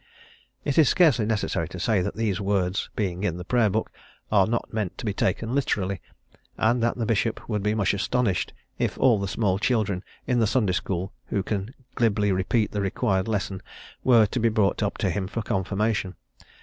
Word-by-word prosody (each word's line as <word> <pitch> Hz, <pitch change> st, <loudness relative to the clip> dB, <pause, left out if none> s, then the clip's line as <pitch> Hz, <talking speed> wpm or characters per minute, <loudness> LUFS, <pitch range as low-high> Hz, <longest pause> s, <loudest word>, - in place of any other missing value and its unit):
It 140 Hz, +2 st, +2 dB
is 150 Hz, -, +6 dB
scarcely 135 Hz, -, +4 dB
necessary 100 Hz, -7 st, -1 dB
to 90 Hz, +1 st, -8 dB
say 105 Hz, +1 st, +2 dB
that -, -, -3 dB
these 105 Hz, -4 st, -1 dB
words 95 Hz, -1 st, 0 dB
being 95 Hz, -2 st, -2 dB
in 90 Hz, -5 st, 0 dB
the 90 Hz, -, -7 dB
Prayer 120 Hz, 0 st, +3 dB
Book 110 Hz, +3 st, -1 dB, 0.4 s
are 100 Hz, -3 st, +5 dB
not 115 Hz, +1 st, -2 dB
meant 105 Hz, -5 st, -2 dB
to -, -, -6 dB
be 105 Hz, -, 0 dB
taken 110 Hz, +5 st, -1 dB
literally, 100 Hz, -9 st, 0 dB, 0.6 s
and 120 Hz, +2 st, +2 dB
that 120 Hz, +1 st, +1 dB
the 115 Hz, -, -1 dB
bishop 115 Hz, +1 st, 0 dB
would 105 Hz, -3 st, -1 dB
be 105 Hz, +2 st, 0 dB
much 100 Hz, -3 st, +2 dB
astonished 100 Hz, 0 st, 0 dB, 0.3 s
if -, -, -1 dB
all 115 Hz, -5 st, +4 dB
the 100 Hz, -, -2 dB
small 95 Hz, -1 st, 0 dB
children 105 Hz, -6 st, 0 dB, 0.2 s
in 125 Hz, -2 st, +1 dB
the 110 Hz, -, +3 dB
Sunday 110 Hz, -4 st, +1 dB
School 90 Hz, +1 st, -2 dB
who 100 Hz, -3 st, -1 dB
can 105 Hz, +5 st, -3 dB, 0.2 s
glibly 105 Hz, -4 st, +2 dB
repeat 95 Hz, +4 st, +1 dB
the 105 Hz, -, -2 dB
required 95 Hz, 0 st, 0 dB
lesson, 100 Hz, -3 st, -2 dB, 0.4 s
were 120 Hz, -4 st, +6 dB
to 115 Hz, +5 st, -2 dB
be 115 Hz, 0 st, +3 dB
brought 105 Hz, -2 st, +1 dB
up 105 Hz, -1 st, -1 dB
to 95 Hz, -5 st, 0 dB
him 95 Hz, +1 st, -2 dB
for 110 Hz, +3 st, -4 dB
confirmation. 95 Hz, 0 st, -1 dB
105 Hz, 195 wpm, -25 LUFS, 95-115 Hz, 0.6 s, is